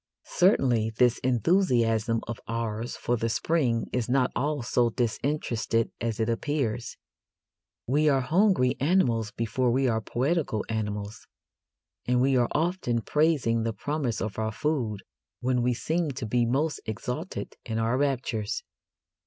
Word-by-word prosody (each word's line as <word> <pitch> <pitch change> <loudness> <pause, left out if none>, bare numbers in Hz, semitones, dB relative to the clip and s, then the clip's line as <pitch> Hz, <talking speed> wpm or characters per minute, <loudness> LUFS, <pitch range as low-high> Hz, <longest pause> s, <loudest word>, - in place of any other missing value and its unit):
Certainly 125 - +3
this 125 -1 +4
enthusiasm 115 - +2
of 120 -1 -5
ours 115 0 -3
for 120 - 0
the 115 +1 -1
spring 120 -2 +1
is 125 -2 -1
not 130 0 +2
all 145 -2 -1
so 120 0 +2
disinterested 115 -1 -1
as 115 -1 -2
it 110 - +1
appears. 120 -1 -2 0.9
We 150 +4 +3
are 135 -2 +3
hungry 165 -2 +3
animals 125 - +2
before 115 +3 -1
we 130 +2 +2
are 110 -2 +1
poetical 135 -1 -1
animals, 105 -1 -4 0.8
and 125 0 +3
we 135 +1 +3
are 120 -2 +3
often 160 -8 0
praising 145 -6 +2
the 115 0 -1
promise 145 -2 -2
of 110 0 -4
our 110 0 -1
food 115 -6 -2 0.4
when 125 0 +1
we 125 0 +1
seem 160 +5 -1
to 130 -2 -5
be 120 +2 +1
most 145 +6 0
exalted 125 - -4
in 110 -1 -3
our 115 +2 +1
raptures. 120 -6 -1
120 Hz, 140 wpm, -27 LUFS, 115-145 Hz, 0.9 s, this